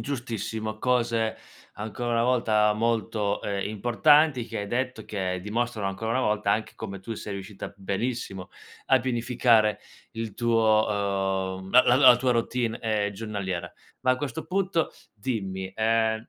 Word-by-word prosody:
giustissimo. 110 -4 -4
Cose, 115 -2 +1 0.4
ancora 110 +3 -4
una 115 0 +2
volta, 110 -4 +3
molto, 110 -2 0
ehm, 100 -1 -2
importanti 125 +5 +3
che - - -5
hai 100 - -3
detto, 125 0 -2
che 95 -3 -3
dimostrano 110 +1 -2
ancora 110 +4 -3
una 130 - +1
volta, 105 -4 +1
anche 110 - -2
come 100 -1 -6
tu 115 +4 -6
sei 105 -1 -6
riuscita 100 +1 -7
benissimo 100 -1 -3 0.4
a 130 -1 +4
pianificare 115 -3 +2 0.3
il 115 -2 -5
tuo, 115 -2 +3 0.7
uhm, 95 - -10
la 125 +4 +7
la 125 - +4
la 130 -3 +8
tua 125 0 +1
routine, 115 0 -1
ehm, 105 -3 -1
giornaliera. 95 -4 -4 0.3
Ma 130 - +3
a - - 0
questo 135 -3 -4
punto, 185 -3 0 0.2
dimmi: 95 -4 -4
ehm, 110 0 +1
110 Hz, 145 wpm, -26 LUFS, 105-120 Hz, 0.7 s, la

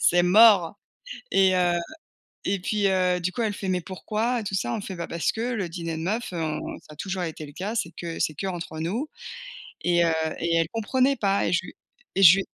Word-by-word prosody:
C'est 175 0 +5
mort!» 200 0 +6 0.6
et 190 -1 +4
heu, 175 -1 +3 0.7
et 195 -1 0
puis, 205 +2 0
heu, 180 -1 +2
du 180 +1 -1
coup, 240 - -2
elle 210 -2 0
fait: 190 - -5
«Mais 180 -1 +1
pourquoi?», 215 +7 -2
et - - -6
tout 195 -1 -4
ça, 120 -10 -1
on - - -2
fait: 195 - -6
«Bah, 170 - -5
parce 170 -4 0
que 220 - -5
le 230 -7 -1
dîner 165 -1 -4
de 160 - -5
meufs, 215 +3 -2
on 155 -3 -2 0.2
ça 155 - -16
a - - -13
toujours 190 +2 -3
été 160 -1 -6
le 145 - -12
cas, 200 +8 -4
c'est 170 -7 -1
que 170 -1 -5
c'est 155 - 0
que 195 - -4
entre 170 -3 -5
nous» 210 - -2 0.7
et 175 -1 +3
heu, 165 - +2 0.3
et 170 0 0
elle 165 -1 +2
comprenait 255 +5 +1
pas 200 -1 +1
et - - 0
je 175 0 +1
lui - - -11 0.4
et 195 - +1
je 185 0 +10
lui 195 - -2
185 Hz, 240 wpm, -25 LUFS, 170-205 Hz, 0.7 s, je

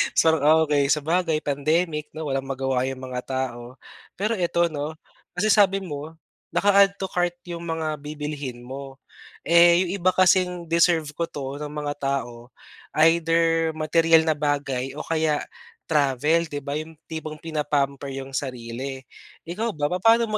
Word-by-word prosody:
'tsang, 160 -1 +4 0.2
okay, 145 -2 +2
sabagay 160 +2 +1
pandemic, 150 +2 0
'no, 160 0 -5
walang 135 0 -2
magawa 130 -1 -1
'yong 135 -1 -5
mga 125 -1 -4
tao. 130 -2 -4 0.4
Pero 215 +4 -1
eto, 170 -1 +1
'no, 150 +1 -4 0.4
kasi 210 +3 +2
sabi 195 -2 +4
mo, 155 -1 -7 0.4
naka-add 200 0 +5
to 190 -1 -5
cart 175 -1 0
'yong 170 -1 -6
mga 160 -2 -2
bibilhin 145 -4 -6
mo, 135 +1 -8 0.5
eh, 170 +1 +6
'yong 180 - -4
iba 185 +1 +2
kasing 180 -1 +3
deserve 165 -3 +3
ko 170 +2 -3
'to 140 0 -6
ng 150 0 -5
mga 145 -1 -2
tao, 125 -4 -3 0.6
either 165 -1 +3
materyal 165 +1 +4
na 160 - +2
bagay 140 -3 -1
o 155 - -5
kaya 155 -2 0 0.5
travel, 150 +3 +2
'di 145 -1 -6
ba? 145 +1 -3
'Yong 160 +1 -9 0.2
tipong 155 -1 -5
pina-pamper 140 -3 -1
'yong 135 0 -7
sarili. 130 0 -5 0.4
Ikaw 205 +5 -3
ba, 145 +1 -1
papaano 225 +6 +4
155 Hz, 145 wpm, -24 LUFS, 140-170 Hz, 0.6 s, eh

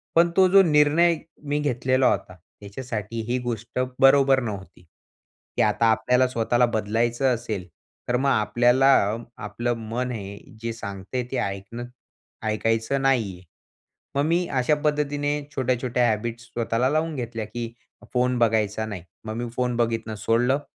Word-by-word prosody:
पण 170 +1 +5
तो 190 -1 +7
जो 195 0 +8
निर्णय 155 +2 +4 0.3
मी 145 +1 -1
घेतलेला 130 -2 +1
होता, 90 - -3 0.3
ह्याच्यासाठी 110 +1 -5
ही 125 - +2
गोष्ट 120 0 -4 0.2
बरोबर 135 0 +6
नव्हती. 95 -4 -7 0.7
की - - +3
आता 105 +2 +2
आपल्याला 125 +3 +3
स्वतःला 120 0 +2
बदलायचं 120 +3 0
असेल, 110 -6 -5 0.4
तर 125 - +2
मग 135 +1 +1
आपल्याला 120 +4 +3 0.6
आपलं 120 +4 -2 0.2
मन 125 +2 -2
हे 100 -3 -6 0.2
जे 115 0 -3
सांगतंय 100 +3 -5
ते 130 - -1
ऐकणं 100 +5 -4 0.6
ऐकायचं 115 +5 0
नाहीये. 110 -10 +1 0.7
मग 140 - +2
मी 170 +2 +1
अशा 135 +2 +1
पद्धतीने 145 0 0
छोट्या-छोट्या 125 -2 +1
हॅबिट्स 115 +2 -3
स्वतःला 120 +2 0
लावून 155 +1 0
घेतल्या 115 -3 -4
की 115 +1 -5 0.4
फोन 125 0 +1
बघायचा 110 -1 +1
नाही 100 -6 -6 0.2
मग 110 - -4
मी 120 -1 -3
फोन 125 -1 0
बघणं 115 -2 -1
सोडलं 120 +6 +1
120 Hz, 140 wpm, -24 LUFS, 110-135 Hz, 0.7 s, जो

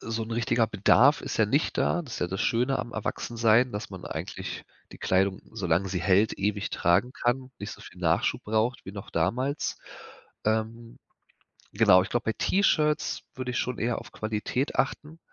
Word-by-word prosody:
so 115 0 -3
'n 110 - -10
richtiger 115 0 +1
Bedarf 130 +9 +4
ist - - -4
ja 110 - +3
nicht 140 +9 0
da. 175 - +1
Das 130 -7 -8
ist - - -5
ja - - +1
das 95 +2 -4
Schöne 125 +4 +1
am 120 - -5
Erwachsensein, 115 +2 +1
dass 105 0 -5
man 95 -2 -8
eigentlich - - -6 0.3
die - - -12
Kleidung, 95 +1 +1
solange 90 +1 0
sie 90 -1 -2
hält, 95 +4 +3
ewig 100 +1 -1
tragen 100 +9 +2
kann, 130 +1 -1
nicht 100 +1 -6
so - - -12
viel - - -13
Nachschub - - +1
braucht 110 +3 0
wie 95 - -8
noch 100 -1 -8
damals. 130 - -1 0.7
Ähm, 110 +2 -2 0.8
genau, 90 - +6
ich - - -7
glaube, 120 -1 -1
bei 110 - +1
T-Shirts 155 -6 +1
würde 130 -1 -4
ich 120 - -2
schon 125 -1 -2
eher 115 +1 0
auf - - -13
Qualität 110 +5 -2
achten, 150 +4 -2
115 Hz, 185 wpm, -27 LUFS, 100-125 Hz, 0.8 s, genau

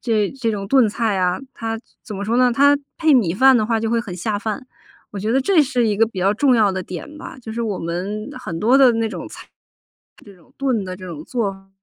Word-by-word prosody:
这 215 -5 +1
这 230 -4 -1
种 200 -2 -4
炖 250 -1 +4
菜 215 -1 -1
啊， 180 -1 +1 0.2
它 225 -1 -4 0.2
怎 215 - -8
么 200 - -4
说 230 +3 0
呢？ 250 0 +4
它 285 +3 +5 0.2
配 315 -3 +4
米 195 -10 +3
饭 260 +5 +5
的 215 - +2
话 225 0 0
就 225 0 -2
会 230 0 +1
很 200 -6 -7
下 205 +4 -2
饭。 220 +4 -4 0.5
我 200 - -5
觉 215 +2 -2
得 265 +3 +3
这 320 +2 +4
是 250 -4 0
一 205 -2 0
个 225 - +5
比 210 -4 -9
较 195 +3 +2
重 255 +1 +3
要 205 -3 +3
的 185 0 -3
点 185 - -8
吧， 320 - -9
就 220 -2 -8
是 235 +1 -3
我 210 -4 -2
们 185 +6 -4
很 165 -1 -5
多 240 +8 +4
的 265 -3 +7
那 225 -1 0
种 - - -7
菜， - - -11
是 - - -30 0.8
这 180 - -23
种 - - -26
炖 250 -8 0
的 185 0 -5
这 185 0 -10
种 155 -3 -7
做 195 -6 -3
220 Hz, 275 characters per minute, -20 LUFS, 195-245 Hz, 0.8 s, 的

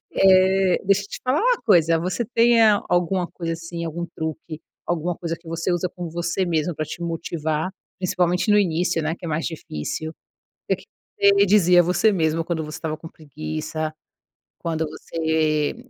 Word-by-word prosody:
Eh, 190 -1 +4
deixa 195 +1 +3
eu - - -9
te - - -7
falar 260 +7 +2
uma - - +3
coisa, 165 -5 +4
você 180 +7 -2
tem 235 +1 +4 0.3
alguma 180 +1 +1
coisa 165 -2 -4
assim, 170 0 -6
algum 170 +1 -4
truque, 160 -1 -6 0.3
alguma 175 0 -1
coisa 165 -1 -4
que 170 - -24
você 165 +2 -1
usa 175 +1 0
com 175 0 -7
você 170 +3 -1
mesmo 165 -1 0
para 155 - -2
te 165 - -8
motivar, 165 0 -2 0.3
principalmente 180 +1 +1
no 210 - +6
início, 175 -3 +1
né, 155 +1 -1
que - - -13
é 170 - -3
mais 160 +1 -1
difícil? 160 - -5 0.6
O - - +3
que - - -17 0.3
você 400 0 +5
dizia 180 -4 +5
a 175 - +6
você 180 +5 +3
mesmo 165 -3 +1
quando 165 -1 -2
você 155 0 -7
estava 155 -1 -4
com 165 - -10
preguiça, 155 +1 -5 0.7
quando 160 -1 -2
você 155 -1 0
170 Hz, 175 wpm, -23 LUFS, 160-185 Hz, 0.7 s, no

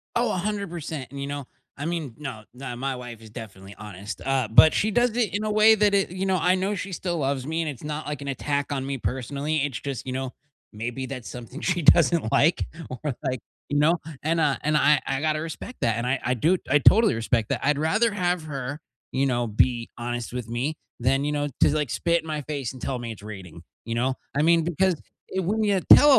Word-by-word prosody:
Oh, 240 +1 +2
100%, 175 -7 -3
and, 140 - -7
you 140 - -3
know, 145 -1 -4 0.3
I 145 - -4
mean 160 -8 -3
no, 135 -8 -6
nah, 125 -1 -6
my 135 +2 -2
wife 120 -2 -8
is 110 - -12
definitely 100 -3 -10
honest. 105 0 -7
Uh, 135 -3 +1
but 135 +8 +8
she 215 - +2
does 240 +3 +3
it 240 -3 +1
in 205 - -1
a 215 - 0
way 215 +1 +7
that 210 -1 +3
it 195 -1 +3
you 185 +1 -2
know, 190 -1 +2
I 180 +3 +3
know 190 +2 0
she 190 +1 -5
still 175 -1 -2
loves 135 -3 -1
me 160 +2 -1
and 160 - -2
it's 135 -5 -8
not, 150 +1 -4
like, 150 -1 -4
an 140 - -6
attack 140 +1 -1
on 135 -2 -2
me 140 0 -2
personally. 140 +5 -2
It's 140 -4 -1
just, 135 -4 -5
you 130 - -2
know, 130 -1 -3 0.4
maybe 120 +5 -4
that's 130 -3 -6
something 125 +4 -8
she 180 -1 0
doesn't 165 -5 +5
like, 160 +4 +3 0.2
or 130 +1 -4
like, 130 -2 -1 0.3
you 145 - +1
know, 165 +3 +4 0.2
and, 165 +2 +1
uh, 150 -4 +2
and 150 0 +2
I 150 -1 +5
I 135 0 -1
gotta 155 0 +1
respect 165 +10 -7
that, 115 -1 +2
and 120 - -2
I 130 +1 +1
I 125 - +1
do, 160 +10 +2
I 145 - +5
totally 220 - +6
respect 115 -1 0
that. - - -1
I'd 145 0 +2
rather 215 +9 +2
have 180 -4 0
her, 140 -1 -4 0.3
you 135 +1 +1
know, 120 -3 +1
be 115 +2 +1
honest 120 -1 -4
with 125 -3 -4
me 125 +7 -1 0.2
than, 135 +3 +2
you 150 - 0
know, 145 0 0
just, 150 - +5
like, 150 -4 0
spit 170 0 +1
in 160 - -13
my 155 -1 -2
face 140 -4 -4
and 130 - -11
tell 130 - -2
me 120 -1 -5
it's 110 - -10
raining, 95 -6 -9 0.2
you 115 - -3
know? 130 +3 +1 0.2
I 145 - +2
mean, 165 +1 +4
because 175 +2 +2 0.4
when 200 +4 +1
you 200 -2 +3
tell 290 -2 +8
145 Hz, 235 wpm, -25 LUFS, 125-170 Hz, 0.4 s, but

